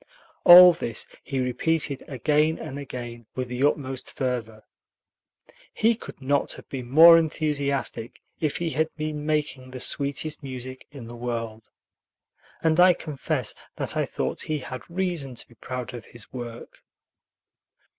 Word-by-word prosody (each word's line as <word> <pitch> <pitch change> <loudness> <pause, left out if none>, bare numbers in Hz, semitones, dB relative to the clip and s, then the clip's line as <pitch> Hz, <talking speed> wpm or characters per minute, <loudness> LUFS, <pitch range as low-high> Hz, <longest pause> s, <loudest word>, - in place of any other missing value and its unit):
All 180 0 +11
this 115 -9 -4 0.2
he 135 - -4
repeated 140 +3 0
again 150 +4 +1
and 145 -3 -7
again 120 -4 -7
with 130 -1 -3
the 125 +2 -2
utmost 135 -3 -1
fervor. 115 -5 -3 1.1
He 225 +2 +3
could 225 - -10
not 140 +1 0
have - - -11
been 125 -3 -6
more 165 +4 +9
enthusiastic 140 -7 -2 0.2
if 155 -3 -1
he 170 -1 -2
had 160 +1 0
been 155 -1 -4
making 145 -4 -1
the 130 0 -8
sweetest 145 +4 -1
music 130 -1 -8
in 140 -5 -10
the 120 +1 -9
world. 115 -2 -5 0.9
And 160 +1 +3
I 180 0 +8
confess 150 -5 -3 0.2
that - - -4
I - - 0
thought - - -3
he 155 - -2
had 130 -2 -7
reason 170 -7 -2
to - - -3
be - - -19
proud 125 +1 -6
of 120 -4 -8
his 120 -3 -7
work. 120 -2 -8
140 Hz, 145 wpm, -25 LUFS, 125-155 Hz, 1.1 s, All